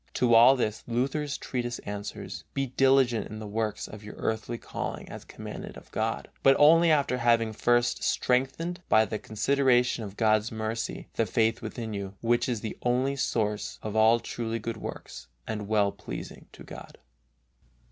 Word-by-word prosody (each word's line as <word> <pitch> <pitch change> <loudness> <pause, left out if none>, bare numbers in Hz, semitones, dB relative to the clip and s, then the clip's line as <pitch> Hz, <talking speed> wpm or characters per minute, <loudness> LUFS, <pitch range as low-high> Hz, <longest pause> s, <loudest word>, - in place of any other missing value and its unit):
To 120 -2 +3
all 120 +4 +8
this 110 -4 -2
Luther's 140 +5 -1
treatise 120 -2 -3
answers: 100 0 -6
Be 135 - +1
diligent 130 -2 +3
in 110 - -8
the 110 - -7
works 105 +1 -2
of 105 0 -11
your 105 - -9
earthly 110 +1 -2
calling - - -5
as - - -8
commanded - - -8
of - - -15
God, 65 +3 -2
but 135 0 +6
only 165 +3 +6
after 140 -5 +2
having 115 -2 +2
first 120 +2 +2
strengthened, 135 +8 0
by 110 0 +5
the 110 -1 -4
consideration 125 0 +2
of 100 -1 -8
God's 110 0 +2
mercy, 110 0 -4
the 115 - 0
faith 115 +4 +1
within 110 0 -5
you, 100 -1 -5
which 120 +2 +1
is 115 -4 -2
the 110 - -6
only 130 +3 +1
source 110 -5 -1
of 110 0 -4
all 110 +2 +5
truly 115 -1 -4
good 115 0 -5
works - - -8 0.2
and 105 -2 -4
well 105 -2 +2
pleasing - - -8
to - - -12
God. - - -11
115 Hz, 165 wpm, -28 LUFS, 110-125 Hz, 0.2 s, all